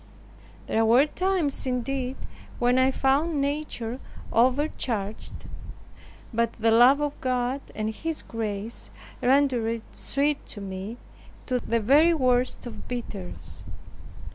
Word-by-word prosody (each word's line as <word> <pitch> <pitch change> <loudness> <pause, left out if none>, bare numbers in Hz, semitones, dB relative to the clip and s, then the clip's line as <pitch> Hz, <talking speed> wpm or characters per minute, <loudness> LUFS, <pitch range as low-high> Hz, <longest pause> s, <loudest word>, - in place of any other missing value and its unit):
There 225 - +1
were 240 +5 +6
times 345 -5 0
indeed 255 +1 -2 0.4
when 245 +1 +3
I 260 0 +5
found 280 +4 +1
nature 275 -4 -2 0.3
overcharged; 235 -4 0 0.9
but 230 0 +1
the 225 0 +1
love 245 +5 +7
of 295 -1 -3
God 255 +1 0
and 215 0 -2
His 325 +5 -3
grace 220 0 -4 0.3
rendered 245 -4 +2
sweet 285 +1 -1
to - - -5
me 195 +3 -6 0.5
the 245 -2 0
very 295 +10 +5
worst 255 -3 +1
of 225 -3 -8
bitters. 180 - -2
250 Hz, 110 wpm, -26 LUFS, 225-275 Hz, 0.9 s, love